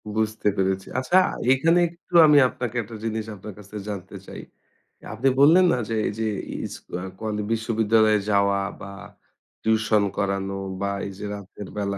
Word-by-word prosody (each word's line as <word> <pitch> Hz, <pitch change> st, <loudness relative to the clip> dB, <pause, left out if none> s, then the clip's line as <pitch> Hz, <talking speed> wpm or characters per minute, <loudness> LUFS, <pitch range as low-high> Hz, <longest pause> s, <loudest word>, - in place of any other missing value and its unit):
বুঝতে 110 Hz, -1 st, -1 dB
পেরেছি। 95 Hz, 0 st, 0 dB
আচ্ছা, 175 Hz, +8 st, +2 dB, 0.4 s
এখানে 165 Hz, +6 st, +3 dB
একটু 170 Hz, +1 st, -22 dB
আমি 150 Hz, -1 st, +6 dB
আপনাকে 125 Hz, -2 st, -5 dB
একটা 110 Hz, +2 st, -10 dB
জিনিস 110 Hz, -1 st, -2 dB
আপনার 100 Hz, +1 st, -9 dB
কাছে 105 Hz, +1 st, -13 dB
জানতে 100 Hz, -1 st, -7 dB
চাই। -, -, -8 dB, 0.7 s
আপনি 130 Hz, +5 st, 0 dB
বললেন 170 Hz, +6 st, +7 dB
না, -, -, 0 dB
যে 115 Hz, -, -1 dB
এই -, -, -1 dB
যে 110 Hz, -, 0 dB, 0.4 s
ইস্কু -, -, -10 dB
আ -, -, -5 dB
কলে 110 Hz, -1 st, -3 dB
বিশ্ববিদ্যালয়ে 110 Hz, -1 st, +2 dB
যাওয়া 100 Hz, 0 st, +3 dB, 0.2 s
বা 100 Hz, -, -8 dB, 0.7 s
টিউশন 110 Hz, -1 st, +2 dB
করানো 100 Hz, -1 st, -1 dB, 0.3 s
বা 100 Hz, -, 0 dB, 0.2 s
এই -, -, -6 dB
যে 105 Hz, -, -6 dB
রাতের 100 Hz, 0 st, -9 dB
বেলা 100 Hz, -1 st, -2 dB
110 Hz, 160 wpm, -24 LUFS, 100-115 Hz, 0.7 s, বললেন